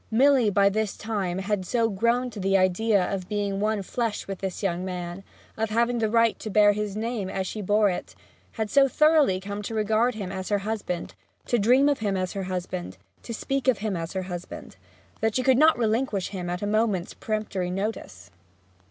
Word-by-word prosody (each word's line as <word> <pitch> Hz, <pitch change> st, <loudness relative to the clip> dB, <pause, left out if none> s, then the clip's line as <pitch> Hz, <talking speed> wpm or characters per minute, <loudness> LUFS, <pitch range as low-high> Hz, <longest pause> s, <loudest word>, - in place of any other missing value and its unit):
Milly 255 Hz, 0 st, +4 dB
by 200 Hz, 0 st, +4 dB
this 210 Hz, 0 st, -1 dB
time 200 Hz, -5 st, -2 dB
had 195 Hz, 0 st, -1 dB
so 230 Hz, +5 st, +1 dB
grown 235 Hz, +4 st, 0 dB
to 215 Hz, -, -8 dB
the 195 Hz, 0 st, +2 dB
idea 190 Hz, +2 st, +2 dB
of 185 Hz, -1 st, -4 dB
being 205 Hz, -2 st, -1 dB
one 210 Hz, -1 st, 0 dB
flesh 230 Hz, +1 st, -3 dB
with 195 Hz, -1 st, -5 dB
this 190 Hz, +1 st, -4 dB
young 180 Hz, -2 st, -1 dB
man, 180 Hz, 0 st, -5 dB, 0.3 s
of 220 Hz, 0 st, -1 dB
having 235 Hz, +2 st, +1 dB
the 220 Hz, -1 st, +1 dB
right 230 Hz, 0 st, +3 dB
to 220 Hz, -, -5 dB
bear 205 Hz, 0 st, +5 dB
his 210 Hz, -1 st, -3 dB
name 220 Hz, -3 st, -3 dB
as 190 Hz, 0 st, -2 dB
she 210 Hz, +3 st, -5 dB
bore 205 Hz, +2 st, +3 dB
it; 180 Hz, -, -4 dB, 0.4 s
had 220 Hz, -2 st, -3 dB
so 275 Hz, -1 st, +5 dB
thoroughly 305 Hz, -8 st, +4 dB
come 200 Hz, +2 st, -5 dB
to 220 Hz, +2 st, -5 dB
regard 220 Hz, +3 st, +2 dB
him 195 Hz, -4 st, -5 dB
as 190 Hz, -1 st, -5 dB
her 205 Hz, -, +2 dB
husband, 205 Hz, -5 st, -3 dB, 0.3 s
to 240 Hz, -, +1 dB
dream 250 Hz, +7 st, +4 dB
of 290 Hz, -1 st, +2 dB
him 200 Hz, -3 st, -1 dB
as 185 Hz, -1 st, -2 dB
her 195 Hz, -1 st, -3 dB
husband, 180 Hz, -, -4 dB, 0.2 s
to -, -, -8 dB
speak 270 Hz, +4 st, -2 dB
of 255 Hz, -4 st, +4 dB
him 210 Hz, -2 st, -2 dB
as 165 Hz, 0 st, -4 dB
her 190 Hz, -1 st, -2 dB
husband, 180 Hz, -1 st, -8 dB, 0.4 s
that 220 Hz, -1 st, 0 dB
she 255 Hz, -, +1 dB
could 260 Hz, 0 st, +4 dB
not 315 Hz, +1 st, +6 dB
relinquish 225 Hz, -3 st, 0 dB
him 180 Hz, -3 st, -5 dB
at 180 Hz, +2 st, -3 dB
a -, -, 0 dB
moment's 210 Hz, -4 st, 0 dB
peremptory 210 Hz, -4 st, -3 dB
notice. 185 Hz, -, -5 dB
210 Hz, 205 wpm, -26 LUFS, 190-225 Hz, 0.4 s, not